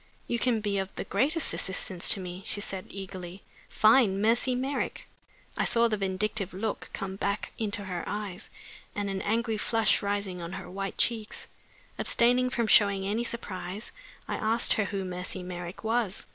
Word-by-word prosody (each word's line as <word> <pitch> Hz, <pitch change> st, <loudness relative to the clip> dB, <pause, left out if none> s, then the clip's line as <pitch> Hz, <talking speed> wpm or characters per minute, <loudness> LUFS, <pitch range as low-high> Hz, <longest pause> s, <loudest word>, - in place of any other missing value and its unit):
"You 235 Hz, -, 0 dB
can 235 Hz, -3 st, +2 dB
be 205 Hz, -2 st, 0 dB
of 190 Hz, 0 st, -2 dB
the -, -, -3 dB
greatest 290 Hz, -, +2 dB
assistance 185 Hz, -1 st, +2 dB
to 200 Hz, -, +7 dB
me," 180 Hz, 0 st, -6 dB
she -, -, -1 dB
said, 195 Hz, -2 st, -4 dB
eagerly. 190 Hz, -1 st, -8 dB, 0.3 s
"Find 215 Hz, -3 st, +5 dB
Mercy 235 Hz, +4 st, +3 dB
Merrick!" 265 Hz, +3 st, -2 dB, 0.5 s
I -, -, +1 dB
saw 235 Hz, 0 st, +3 dB
the 220 Hz, -, 0 dB
vindictive 195 Hz, 0 st, -1 dB
look 210 Hz, +2 st, -3 dB
come 190 Hz, 0 st, -5 dB
back 200 Hz, +1 st, -1 dB
into 205 Hz, -2 st, -1 dB
her 180 Hz, -3 st, -4 dB
eyes, 205 Hz, -1 st, -5 dB, 0.5 s
and 205 Hz, -1 st, -1 dB
an 190 Hz, -1 st, -2 dB
angry 225 Hz, +1 st, 0 dB
flush 225 Hz, 0 st, +3 dB
rising 200 Hz, -3 st, -2 dB
on 170 Hz, +2 st, -6 dB
her 190 Hz, -1 st, -7 dB
white 195 Hz, +1 st, -4 dB
cheeks. 220 Hz, -3 st, 0 dB, 0.5 s
Abstaining 250 Hz, +2 st, +3 dB
from 240 Hz, -2 st, 0 dB
showing 200 Hz, -3 st, +5 dB
any 215 Hz, +4 st, 0 dB
surprise, 210 Hz, -3 st, -5 dB, 0.4 s
I -, -, -2 dB
asked 225 Hz, +2 st, +3 dB
her 215 Hz, -, +1 dB
who 195 Hz, -1 st, -3 dB
Mercy 180 Hz, 0 st, -4 dB
Merrick 180 Hz, +1 st, -7 dB
was. 225 Hz, -3 st, 0 dB
205 Hz, 170 wpm, -29 LUFS, 190-225 Hz, 0.5 s, to